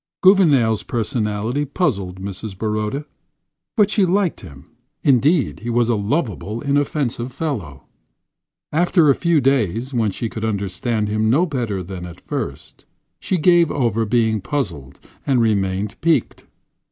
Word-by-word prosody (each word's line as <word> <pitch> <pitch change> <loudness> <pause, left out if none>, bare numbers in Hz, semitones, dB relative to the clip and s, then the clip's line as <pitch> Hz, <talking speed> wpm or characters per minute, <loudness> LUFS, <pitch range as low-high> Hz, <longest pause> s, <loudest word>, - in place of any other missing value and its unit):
Gouvernail's 145 - +5
personality 110 +3 -1
puzzled 100 - -2
Mrs. 95 +1 -6
Baroda, 110 +7 -2 0.7
but 210 -1 +4
she 205 - +3
liked 185 -1 +1
him. 70 0 -13 0.3
Indeed, 140 +1 +3
he 115 +4 -5
was 120 0 +2
a 120 - +3
lovable, 110 - -2
inoffensive 140 -3 -1
fellow. 110 - -4 0.9
After 165 -1 +4
a - - +5
few 170 +2 +2
days, 130 -2 0
when 115 -3 +1
she 115 +4 -3
could 110 0 -6
understand 105 +1 -1
him 110 +1 0
no 150 +10 +4
better 120 - -3
than 90 0 -7
at 85 - -11
first, - - -6 0.3
she 185 - -1
gave 170 0 +4
over 115 -5 0
being 110 -1 +1
puzzled 85 - -4 0.3
and 135 -3 +3
remained 100 -2 0
piqued. 165 +1 0
115 Hz, 135 wpm, -20 LUFS, 105-145 Hz, 0.9 s, Gouvernail's